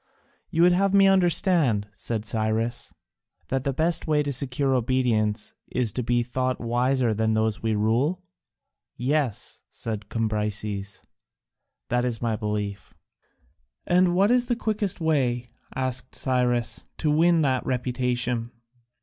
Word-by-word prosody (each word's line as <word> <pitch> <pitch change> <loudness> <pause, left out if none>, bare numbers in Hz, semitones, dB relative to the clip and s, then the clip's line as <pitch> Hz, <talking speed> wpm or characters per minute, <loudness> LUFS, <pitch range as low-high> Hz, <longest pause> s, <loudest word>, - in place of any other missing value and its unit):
"You 165 - +2
would 180 - +6
have 195 +2 +2
me 195 0 +6
understand," 175 - +3
said 110 -2 -4
Cyrus, 110 +2 -2 0.6
"that 135 -1 -1
the 140 - 0
best 165 +5 0
way 150 -1 +2
to 145 -1 -2
secure 135 +1 0
obedience 115 -4 0 0.2
is 120 -4 +1
to 125 - -3
be 120 0 +1
thought 130 +1 -2
wiser 120 0 +1
than 110 +1 0
those 110 -1 0
we 110 -1 0
rule?" 125 - 0 0.7
"Yes," 130 -3 -2
said 110 -2 -6
Cambyses, 105 -2 -3 0.9
"that 125 0 +1
is 120 -3 -2
my 115 -2 -1
belief." 105 -2 -4 0.9
"And 180 0 +3
what 200 +4 +4
is 245 -1 +3
the 240 - +1
quickest 215 -4 -1
way," 130 -7 0 0.3
asked 130 -1 -1
Cyrus, 125 -2 0
"to 150 - 0
win 165 +1 +4
that 130 -3 +1
reputation?" 125 -2 -1
125 Hz, 130 wpm, -25 LUFS, 110-150 Hz, 0.9 s, would